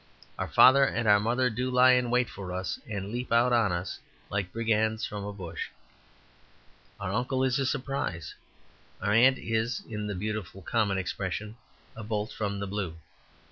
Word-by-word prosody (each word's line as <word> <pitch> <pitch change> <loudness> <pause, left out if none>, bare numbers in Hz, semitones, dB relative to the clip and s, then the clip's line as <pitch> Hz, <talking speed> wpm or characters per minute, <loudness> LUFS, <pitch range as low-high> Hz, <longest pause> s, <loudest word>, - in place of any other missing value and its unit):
Our - - -1
father 135 +2 +7
and 120 -3 0 0.2
mother 125 +2 +1
do 125 +3 -2
lie 125 0 +6
in 125 -1 +3
wait 125 0 +2
for 95 -2 -7
us 95 0 -3
and 100 -2 -4
leap 120 +1 -4
out 120 +1 +4
on 115 -5 +3
us, 90 +1 -3 0.3
like 100 -2 -2
brigands 110 0 0
from 105 -1 -5
a 105 - -4
bush. 95 -5 -6 1.3
Our 100 -1 -3
uncle 130 +3 0
is 130 0 +2
a 135 - +1
surprise. 130 - -3 0.7
Our 100 +2 0
aunt 130 +4 +6
is, 115 +1 -1
in 105 -2 -4
the 105 - -3
beautiful 100 -1 -4
common 105 -1 +1
expression, 95 +3 -3 0.4
a 110 - -7
bolt 105 0 -2
from 100 -2 -3
the 100 - -2
blue. 95 -4 -4
110 Hz, 170 wpm, -28 LUFS, 100-125 Hz, 1.3 s, father